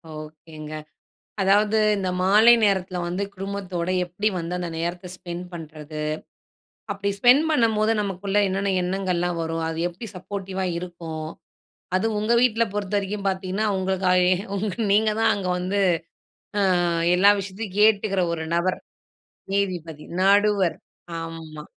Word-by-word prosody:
ஓகேங்க. 155 0 -9 0.7
அதாவது 205 +3 +3 0.2
இந்த 190 -2 -1
மாலை 215 +5 +7
நேரத்துல 190 -2 +1
வந்து 180 +3 -2
குடும்பத்தோட 190 -3 -4 0.2
எப்டி 190 +5 -2
வந்து 170 +2 -4
அந்த 175 -1 -3
நேரத்த 175 +2 -3
ஸ்பெண்ட் 175 0 -6
பண்றது? 155 -2 -7 0.9
அப்டி 200 0 -2
ஸ்பென்ட் 250 +8 +6
பண்ணம்போது 225 -5 +2
நமக்குள்ள 195 0 -2
என்னென்ன 195 +1 -1
எண்ணங்கள்லாம் 180 -2 -1
வரும்? 165 0 -2
அது 165 0 -4
எப்டி 200 +6 -9
சப்போர்ட்டிவா 190 0 -4
இருக்கும்? 170 -3 -6 0.7
அது 190 - +1
உங்க 215 +3 +1
வீட்ல 230 -2 +3
பொறுத்தவரைக்கும் 200 0 -2
பார்த்தீங்கன்னா, 190 +2 -1
உங்களுக்கு 190 0 -1
ஐ 180 - +5 0.4
உங்க 205 0 -2 0.2
நீங்க 215 +1 +4
தான் - - +4
அங்க 190 -2 -3
வந்து 190 +3 -1 0.8
அ - - +3 0.5
எல்லா 200 +3 +6
விஷயத்தையும் 195 +1 -6
கேட்டுக்குற 205 -3 +4
ஒரு 160 -1 -4
நபர். 180 +2 0 0.7
நீதிபதி. 175 -6 -2 0.2
நடுவர். 200 -2 +3 0.4
ஆம்மா. 165 -2 -8
190 Hz, 125 wpm, -24 LUFS, 175-205 Hz, 0.9 s, மாலை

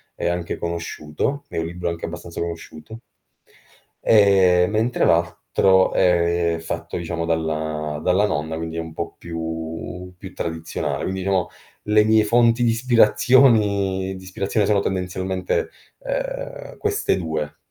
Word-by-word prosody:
è - - -2
anche 85 -1 -2
conosciuto 85 - -3
è - - -6
un 80 - -1
libro 85 +1 -3
anche 85 0 -4
abbastanza 85 0 -7
conosciuto, 85 +4 -7 1.0
ehm, 95 -4 +5
mentre 115 +3 +1
l'altro 90 +3 +3
è 85 -2 +2
fatto - - -5
diciamo 85 -1 -3
dalla 80 -2 -2
dalla 95 +3 +3
nonna, 80 -3 -2
quindi 80 0 -5
è - - -1
un 80 -1 -7
po' 85 +1 -5
più 80 +2 -6
più 95 -1 -10
tradizionale. 80 0 -3
Quindi, 95 0 -3
diciamo 95 -2 0 0.4
le 105 0 +4
mie 110 0 +4
fonti 115 +2 +3
di 115 - +4
ispirazioni 105 -5 +3
di 95 - -11
ispirazione 100 +2 -1
sono 105 -2 +3
tendenzialmente, 95 -1 -2 0.3
uhm, - - -5
queste 425 - 0
2. 80 -4 -3
90 Hz, 130 wpm, -22 LUFS, 80-105 Hz, 1.0 s, ehm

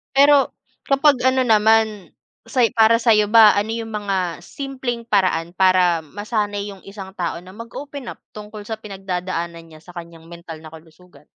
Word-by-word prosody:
Pero 280 0 +5 0.3
kapag 275 -1 +3
ano 260 0 +3
naman 220 -2 +2 0.3
say 245 -4 +2
para 225 0 +4
sayo 220 -3 +3
ba 220 -1 +7
ano 220 +2 -3
'yung 225 -1 -6
mga 190 -6 -2
simpleng 255 +2 -6
paraan 185 -6 0
para 185 -2 +3
masanay 205 +4 -4
'yung 195 - -12
isang 195 -1 -9
tao 180 -3 -3
na 185 - -13
mag-open 250 +5 -9
up - - -8
tungkol 210 0 -10
sa 220 +1 -6
pinagdadaanan 180 -4 -5
niya 155 -1 -16
sa 180 - -13
kaniyang 170 -2 -11
mental 165 -2 -10
na 155 - -11
kalusugan? 160 +1 -17
205 Hz, 160 wpm, -20 LUFS, 180-230 Hz, 0.3 s, ba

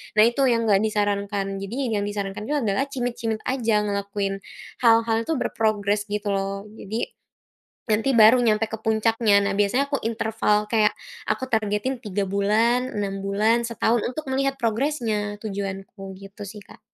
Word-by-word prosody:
Nah, 215 - +7
itu 240 +4 +1
yang 230 -1 +2
enggak 200 -2 +5
disarankan, 200 -2 -1
jadinya 225 +2 -2
yang - - -1
disarankan 205 0 -4
itu 295 - 0
adalah 250 -1 +1
cimit-cimit 240 -4 -3
aja, 230 -5 +1
ngelakuin 200 -1 -2 0.4
hal-hal 230 -1 +4
itu - - +1
berprogres 210 -3 0
gitu 205 0 -2
loh. 195 0 -2
Jadi, 220 +2 -4 0.8
nanti 220 +5 +2
baru 220 +2 +8
nyampe 220 -1 +2
ke 220 - -4
puncaknya. 220 -1 +3
Nah, - - 0
biasanya 210 +7 +2
aku 280 - 0
interval 220 -2 +1
kayak 215 -2 +4 0.4
aku - - 0
targetin 220 +3 -1
3 205 -1 -1
bulan, 225 +6 +2
6 195 -1 -2
bulan, 215 +4 +2
setahun 235 -1 +1
untuk 290 +5 -5
melihat 275 +1 0
progresnya 225 -4 -1
tujuanku, 195 -1 -5
gitu 195 +1 -10
sih, 210 +2 -9
Kak. - - -16
215 Hz, 150 wpm, -24 LUFS, 200-235 Hz, 0.8 s, baru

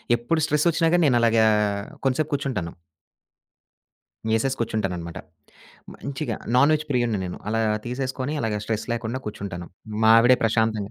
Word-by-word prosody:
ఎప్పుడు 120 +8 -1
స్ట్రెస్సొచ్చినాగాని. 165 +2 +2
నేను 125 -3 +3
అలాగా 115 -1 +4 0.6
కొంచసేపు 135 +4 0
కూర్చుంటాను. 130 -12 -2 1.6
ఏసేసి 130 +4 0
కూర్చుంటాననమాట. 95 -7 -3 0.8
మంచిగా 130 -5 -4 0.2
నాన్‌వెజ్ 150 +4 +4
ప్రియుడిని 120 -6 0
నేను. 90 - -5
అలా 115 +1 0 0.3
తీసేసుకొని 130 +2 -3
అలాగా 110 -3 -1
స్ట్రెస్ 110 -1 -2
లేకుండా 120 +1 -3
కూర్చుంటాను. 95 -4 -6 0.4
మావిడే 115 +3 +7
ప్రశాంతంగా 110 -2 +1
120 Hz, 110 wpm, -24 LUFS, 110-135 Hz, 1.6 s, మావిడే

